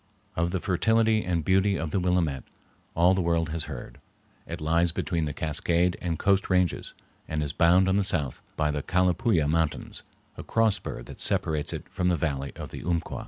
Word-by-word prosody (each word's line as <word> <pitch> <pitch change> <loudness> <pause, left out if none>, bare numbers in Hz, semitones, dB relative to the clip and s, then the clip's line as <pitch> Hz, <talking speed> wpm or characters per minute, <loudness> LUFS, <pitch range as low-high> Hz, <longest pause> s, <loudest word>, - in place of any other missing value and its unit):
Of 85 +1 +1
the 95 +1 -1
fertility 110 +4 +2
and 85 -3 -1
beauty 95 +1 +3
of 80 -2 -3
the 95 - +1
Willamette 90 -7 0 0.5
all 85 +3 +5
the 95 - +1
world 85 -2 +1
has 80 -1 -3
heard. - - -8 0.5
It - - -5
lies 85 +2 +2
between 85 -1 -1
the 75 - -3
Cascade 85 +4 0
and 85 -2 -2
Coast 100 +2 +2
Ranges, 90 -2 0 0.3
and 75 -1 -2
is 75 - -3
bounded 90 +2 +4
on 95 - +2
the 100 - +2
south 80 -9 -2 0.2
by 75 -1 +1
the 75 0 -2
Calapooya 90 - +2
Mountains, 80 0 -1 0.4
a - - -6
cross 115 -2 +2
spur - - -7
that - - -11
separates 75 -2 0
it - - -6
from 90 - -2
the 90 - +2
valley 70 -3 -2
of - - -8
the - - -7
Umpqua. 85 0 -2
85 Hz, 195 wpm, -27 LUFS, 80-95 Hz, 0.5 s, all